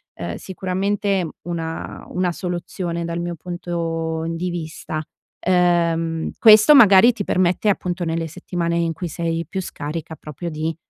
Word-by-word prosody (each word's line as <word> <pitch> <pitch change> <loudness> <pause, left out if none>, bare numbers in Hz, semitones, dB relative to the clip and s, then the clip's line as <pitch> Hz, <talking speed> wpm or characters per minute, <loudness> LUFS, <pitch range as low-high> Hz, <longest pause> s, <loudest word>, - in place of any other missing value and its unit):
ehm, 85 -1 -5
sicuramente 195 0 -1 0.2
una 165 -2 -5
una 180 -1 0
soluzione 175 -1 -4
dal 170 0 -3
mio 175 0 -3
punto 165 -1 -3
di 165 +2 -2
vista. 160 -2 -5 0.4
Ehm, 170 -2 +1
questo 220 +6 +8
magari 225 -1 +8
ti 215 -3 -4
permette 185 +3 +1
appunto, 180 -2 -1
nelle 165 0 -2
settimane 170 0 -3
in 170 -1 +1
cui 175 +3 -5
sei 165 +1 -2
più 190 +3 -3
scarica 160 -1 -6
proprio 155 +3 -7
di, 160 +1 -3
170 Hz, 140 wpm, -21 LUFS, 165-185 Hz, 0.4 s, questo